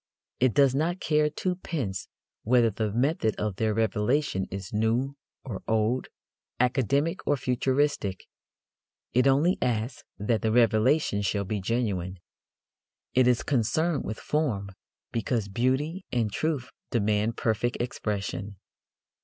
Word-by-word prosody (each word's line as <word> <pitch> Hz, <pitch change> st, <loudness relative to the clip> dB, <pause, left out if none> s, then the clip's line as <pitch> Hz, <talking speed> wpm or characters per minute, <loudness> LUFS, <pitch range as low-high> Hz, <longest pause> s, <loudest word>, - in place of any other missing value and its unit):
It 125 Hz, -3 st, +3 dB
does 140 Hz, -3 st, +5 dB
not 165 Hz, +6 st, 0 dB
care 150 Hz, -2 st, +2 dB
twopence 155 Hz, -, -3 dB, 0.3 s
whether 120 Hz, 0 st, +4 dB
the 105 Hz, +1 st, -2 dB
method 120 Hz, -1 st, +1 dB
of 105 Hz, -3 st, -3 dB
their 110 Hz, 0 st, +1 dB
revelation 110 Hz, 0 st, +1 dB
is 95 Hz, +1 st, -6 dB
new 115 Hz, +6 st, +1 dB, 0.3 s
or 110 Hz, -8 st, -6 dB
old, 110 Hz, +3 st, +1 dB, 0.5 s
academic 135 Hz, +5 st, +1 dB
or 145 Hz, -, +3 dB
futuristic. 130 Hz, -5 st, 0 dB, 0.9 s
It 125 Hz, +2 st, +4 dB
only 145 Hz, +7 st, +3 dB
asks 125 Hz, +4 st, -1 dB
that 110 Hz, +2 st, 0 dB
the 110 Hz, -, +1 dB
revelation 115 Hz, +1 st, +3 dB
shall 100 Hz, 0 st, 0 dB
be 105 Hz, +1 st, -2 dB
genuine. 95 Hz, -4 st, -1 dB, 1.0 s
It 130 Hz, -1 st, +4 dB
is 125 Hz, -2 st, +3 dB
concerned 145 Hz, +6 st, +1 dB
with 110 Hz, -, -4 dB
form, 115 Hz, -11 st, -1 dB, 0.4 s
because 115 Hz, -1 st, -1 dB
beauty 130 Hz, -, 0 dB
and 115 Hz, -4 st, 0 dB
truth 140 Hz, +1 st, -2 dB, 0.2 s
demand 110 Hz, 0 st, +1 dB
perfect 115 Hz, +2 st, 0 dB
expression. 105 Hz, -4 st, -3 dB
120 Hz, 120 wpm, -27 LUFS, 105-140 Hz, 1.0 s, does